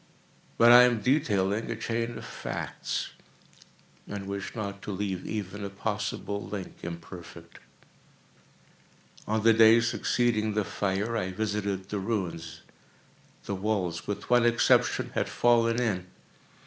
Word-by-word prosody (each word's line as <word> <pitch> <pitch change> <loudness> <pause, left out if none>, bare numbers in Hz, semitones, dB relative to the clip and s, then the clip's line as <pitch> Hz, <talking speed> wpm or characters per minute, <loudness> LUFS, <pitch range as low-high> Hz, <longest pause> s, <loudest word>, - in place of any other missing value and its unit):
But 115 +1 +7
I 120 +1 +10
am 125 -2 +4
detailing 105 -6 +1
a 115 - -2
chain 115 +1 -3
of - - -8
facts—and 100 -1 -7
wish 100 0 -5
not 100 -3 -5
to - - -5
leave 95 -2 -3
even 105 -1 -4
a 100 - -3
possible 100 0 -3
link 95 0 -7
imperfect. 85 0 -9 1.7
On 110 0 0
the 115 0 +6
day 110 +1 +7
succeeding 115 -2 0
the 105 -2 +1
fire, 100 +5 -1
I 95 -5 -1
visited 100 -1 -2
the 105 - -2
ruins. 90 -6 -3 0.8
The 100 - -3
walls, 95 -4 -2
with 105 0 -4
one 120 -1 +4
exception, 120 0 +3
had - - -1
fallen 115 -1 +3
in. 100 -7 -1
105 Hz, 125 wpm, -28 LUFS, 95-115 Hz, 1.7 s, I